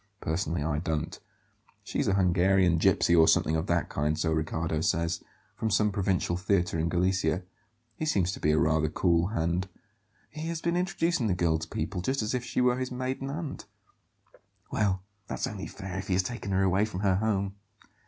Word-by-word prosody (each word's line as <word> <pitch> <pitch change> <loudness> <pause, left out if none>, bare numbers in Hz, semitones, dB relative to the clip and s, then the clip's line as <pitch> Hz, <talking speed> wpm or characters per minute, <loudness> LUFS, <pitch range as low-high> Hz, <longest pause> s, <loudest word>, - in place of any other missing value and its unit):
Personally, 80 -1 -1
I 75 -1 0
don't. 80 -2 -3 0.6
She's - - -2
a 95 - +3
Hungarian 90 -1 +3
gipsy, 85 - +4
or 80 -1 +6
something 80 - +3
of 80 +3 -1
that 85 -1 +1
kind, 75 +1 -1
so 80 0 0
Riccardo 80 0 -1
says; 85 +1 0 0.3
from 110 - -1
some 105 +1 +2
provincial 95 -3 0
theatre 90 -2 0
in 80 +1 0
Galicia. 90 -1 +1 0.5
He 155 - -3
seems 95 - +2
to - - -6
be 75 - +2
rather 80 0 +2
a - - -3
cool 85 +1 +2
hand; 90 -2 -1 0.6
he 155 +1 -5
has 165 -1 -2
been 170 +1 0
introducing 175 -7 0
the 95 - +1
girl 85 -2 +1
to - - -6
people 90 - -3
just 130 +4 0
as 110 - -2
if 125 -1 -1
she 125 - -1
were 125 0 +3
his 130 0 -2
maiden 130 +2 -3
aunt." 150 0 -5 1.0
"Well, 95 -3 0 0.2
that's - - -2
only 100 -3 -5
fair 95 -2 -6
if 95 - -6
he 95 - 0
has 95 +1 +3
taken 120 -3 -5
her 95 0 +2
away 95 +2 +3
from 95 -4 -5
her 95 -3 +3
home." 100 -2 0
95 Hz, 195 wpm, -28 LUFS, 85-110 Hz, 1.0 s, or